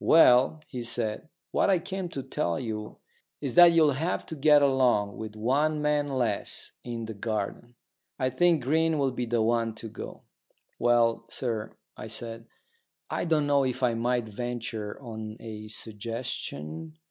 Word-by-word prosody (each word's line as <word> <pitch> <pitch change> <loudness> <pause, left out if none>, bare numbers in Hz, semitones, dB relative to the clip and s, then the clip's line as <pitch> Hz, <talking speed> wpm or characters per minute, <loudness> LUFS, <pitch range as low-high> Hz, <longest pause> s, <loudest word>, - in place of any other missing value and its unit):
"Well," 155 -1 +6
he 125 -4 -5
said, 115 +3 -2 0.2
"what - - +2
I 190 - +5
came 185 +1 -4
to 135 -4 -5
tell 85 -8 -1
you 110 -2 -5 0.4
is 135 -4 -3
that 175 -1 +9
you'll 160 -3 +5
have 160 +6 -1
to 160 - -6
get 150 0 +5
along 125 -7 +3
with 110 -1 -6
one 145 +8 +1
man 150 -1 +1
less 125 -7 0
in 115 -2 -5
the 110 - -6
garden. 110 +3 -4 0.4
I 130 -2 0
think 165 +1 +3
Green 160 +4 +2
will 135 -2 +1
be 125 -1 -3
the 115 -1 +1
one 115 -1 +1
to 115 - -7
go." - - -9 0.6
"Well, 120 -1 +3
sir," 115 -4 -3 0.2
I - - -7
said, 115 0 -5 0.6
"I - - -1
don't 155 -3 +2
know 140 -1 +3
if 130 0 -2
I 120 -2 +3
might 120 0 0
venture 115 -1 -4
on 110 -4 -7
a 110 -1 -8
suggestion." 110 - -6
120 Hz, 160 wpm, -28 LUFS, 110-145 Hz, 0.6 s, that